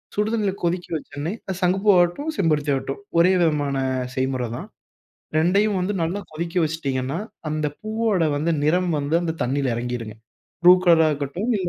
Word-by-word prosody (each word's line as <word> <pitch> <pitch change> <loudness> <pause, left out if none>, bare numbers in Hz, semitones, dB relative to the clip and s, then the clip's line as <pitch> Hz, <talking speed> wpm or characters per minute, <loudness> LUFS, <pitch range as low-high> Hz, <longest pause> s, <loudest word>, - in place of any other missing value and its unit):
சுடு 210 +1 0
தண்ணீல 215 -4 +1
கொதிக்க 175 +1 -1
வைச்ச 160 - -5
உடனே 150 +4 -2 0.3
சங்குப்பூ 190 +2 +1
ஆகட்டும், 175 - +1
செம்பருத்தி 150 - +1
ஆகட்டும் 135 +3 -3 0.2
ஒரே 170 +2 +6
விதமான 145 -4 +1 0.4
செய்முறை 130 -1 -1
தான். - - -7 0.7
2யும் 200 +6 +3
வந்து 190 +3 -1
நல்லா 175 +5 -1
கொதிக்க 170 +2 -5
வைச்சுடீங்கனா, 140 -3 -2 0.3
அந்த 155 0 -1
பூவோட 215 -4 0
வந்து 160 +4 0
நிறம் 175 +5 +2
வந்து 145 +2 -2
அந்த 165 -2 -1
தண்ணீல 135 +2 0
இறங்கிடும்ங்க. 120 -2 -4 0.5
ப்ளூ 175 +1 +9
கலர்ரா 165 -3 +5
இருக்கட்டும் 150 - -3
இல்ல 185 -2 -2
165 Hz, 155 wpm, -23 LUFS, 145-180 Hz, 0.7 s, ப்ளூ